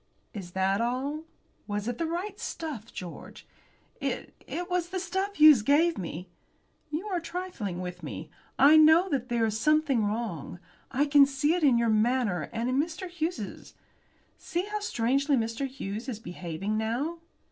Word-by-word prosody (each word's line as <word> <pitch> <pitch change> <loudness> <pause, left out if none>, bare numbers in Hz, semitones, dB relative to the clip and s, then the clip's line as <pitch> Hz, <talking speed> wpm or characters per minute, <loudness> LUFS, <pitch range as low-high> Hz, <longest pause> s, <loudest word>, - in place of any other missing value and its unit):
"Is 180 -4 -8
that 190 +2 +1
all? 270 +6 -2 0.4
Was 205 0 -3
it 240 -1 -3
the 330 - 0
right 370 +5 -4
stuff, 275 -9 -5
George?" 175 -2 -9 0.5
"It - - -3
it 355 +1 -4
was 360 -2 -1
the 375 0 -2
stuff 380 +3 -2
Hughes 305 - +8
gave 315 +8 +3
me." 175 0 -6 0.6
"You 310 +6 -3
are 365 -3 0
trifling 335 - -5
with 180 0 -6
me? - - -7 0.3
I 295 +3 +7
know 320 +4 +6
that 265 -5 -1
there 235 -1 +2
is 220 0 -1
something 305 -3 +3
wrong. 205 -7 -3 0.3
I 280 +4 +1
can 285 -1 +6
see 285 +3 +1
it 355 - 0
in 265 -5 +5
your 235 -1 +2
manner 215 -5 +1
and 230 +1 -2
in 255 +2 +1
Mr. 330 +4 -2
Hughes's. 320 - -5 0.6
See 350 +2 -2
how 420 +1 -3
strangely 275 - +1
Mr. 230 +4 -1
Hughes 235 -2 -6
is 235 - -3
behaving 185 +1 -4
now." 260 +10 -2
265 Hz, 165 wpm, -28 LUFS, 215-325 Hz, 0.6 s, Hughes